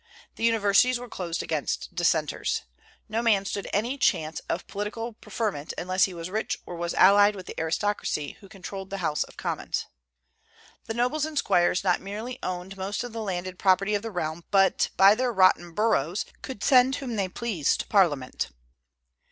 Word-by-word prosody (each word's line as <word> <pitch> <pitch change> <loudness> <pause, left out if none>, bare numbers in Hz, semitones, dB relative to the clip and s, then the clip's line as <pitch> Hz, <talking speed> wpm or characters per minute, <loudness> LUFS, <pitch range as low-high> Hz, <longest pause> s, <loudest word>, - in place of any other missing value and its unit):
The - - -7
universities 225 +2 +4
were 245 +1 -8
closed 175 -6 -4
against 155 +2 -3
Dissenters. 165 -4 0 0.4
No 220 +2 -1
man 210 -4 +3
stood 200 0 -4
any 240 +7 -1
chance 155 - +1
of 175 - -2
political 220 +3 -4
preferment 205 -9 -4
unless 185 +1 +2
he 190 - -6
was 165 0 -5
rich 220 +2 -1
or 175 - -7
was 170 0 -3
allied 205 +2 +6
with 185 -2 -8
the - - -7
aristocracy, 160 -2 -1
who 195 - -15
controlled 195 -1 -8
the 195 - -4
House 150 - +1
of - - -16
Commons. - - -3 1.0
The 225 - -3
nobles 250 +6 +1
and 310 -1 -7
squires 175 -6 +2
not 180 -2 +2
merely 220 +6 -6
owned 185 +1 -5
most 195 +4 -3
of 245 -2 -7
the 225 - -4
landed 185 -2 -4
property 195 +1 +3
of 205 - +1
the 225 - -5
realm, 170 -4 -3
but 195 -1 +3
by 195 +2 +8
their 250 +2 0
"rotten 185 -4 +4
boroughs" 190 -3 +1 0.2
could 260 -6 -7
send 260 0 +5
whom 255 -5 -4
they 195 -3 -1
pleased 190 - 0
to - - -11
Parliament. 150 -11 +1
195 Hz, 175 wpm, -26 LUFS, 175-225 Hz, 1.0 s, by